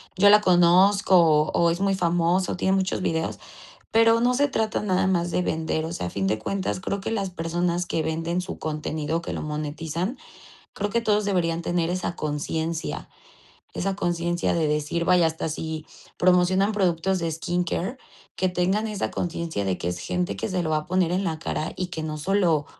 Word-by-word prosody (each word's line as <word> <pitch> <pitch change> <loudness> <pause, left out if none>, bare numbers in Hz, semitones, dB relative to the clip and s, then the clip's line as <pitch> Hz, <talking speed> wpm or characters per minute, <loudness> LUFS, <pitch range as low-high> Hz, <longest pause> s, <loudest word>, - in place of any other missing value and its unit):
yo 205 +2 +6
la 210 +1 +8
conozco, 185 +2 +5
o 155 -2 +4
o 170 -1 +3
es 175 - -2
muy 195 -1 +2
famoso, 175 +1 +1
tiene 190 +1 +1
muchos 190 -1 -1
videos". 160 -2 -1 0.5
Pero 225 0 +5
no 245 +1 +3
se 285 +3 +2
trata 220 -5 -1
nada 190 -2 +1
más 175 -2 +1
de 180 - 0
vender. 160 -1 -1
O 165 - -4
sea, 90 - -3
a - - -4
fin 95 -1 -2
de 110 +2 +1
cuentas, 185 - -2
creo 200 +1 -3
que 195 - -4
las 195 -4 -1
personas 175 +1 -1
que 165 - -1
venden 165 +3 -1
su 180 - -6
contenido, 155 +1 -2
que - - -5
lo - - -4
monetizan, 155 - -3 0.6
creo 205 +1 -2
que 235 - +1
todos 210 -2 +2
deberían 170 -4 0
tener 170 0 0
esa 185 -1 -2
conciencia, 160 +2 -3 0.6
esa 195 +1 -2
conciencia 175 -2 0
de 160 -3 +1
decir 150 +3 -1
vaya, 180 -2 +5
hasta 160 0 -2
si 160 0 -5 0.3
promocionan 185 +3 +3
productos 190 -1 +1
de 165 -1 -2
skincare, 175 - -2 0.4
que 185 - +1
tengan 190 +5 0
esa 210 -2 -2
conciencia 170 - -3
de 95 -2 -1
que 85 - -3
es 90 - -3
gente 180 +1 -2
que - - -3
se 185 -1 0
lo 160 - -2
va 155 - +2
a 155 - -7
poner 180 -1 +1
en 190 +2 0
la 160 -4 -2
cara 155 0 -3
y 185 - -2
que 165 -3 -5
no 155 -1 -4
solo 170 -3 +1
175 Hz, 195 wpm, -25 LUFS, 160-190 Hz, 0.6 s, la